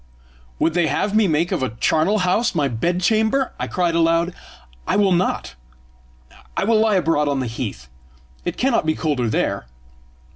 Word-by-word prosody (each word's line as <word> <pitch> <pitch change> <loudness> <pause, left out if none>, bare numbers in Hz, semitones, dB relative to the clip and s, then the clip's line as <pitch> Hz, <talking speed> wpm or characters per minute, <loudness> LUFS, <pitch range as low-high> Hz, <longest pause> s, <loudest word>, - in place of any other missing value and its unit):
"Would 165 - +1
they 175 -1 +2
have 200 +8 -1
me 215 -2 +4
make 165 +1 0
of - - -1
a 120 -4 -3
charnel 175 +7 +2
house 200 +4 +1
my 145 -4 +2
bed 170 +10 -1
chamber?" 220 +7 +1
I - - -2
cried 175 -2 0
aloud. 165 +1 +2 0.5
"I - - +1
will 200 -1 +3
not. 175 - 0 1.0
I - - +1
will 220 +2 +3
lie 220 -1 +3
abroad 165 -5 +1
on 140 -1 0
the 130 - -2
heath; 65 - -5 0.6
it - - -4
cannot 245 -10 +1
be 155 - +2
colder 135 -7 -1
there!" 110 - -1
170 Hz, 175 wpm, -21 LUFS, 150-205 Hz, 1.0 s, me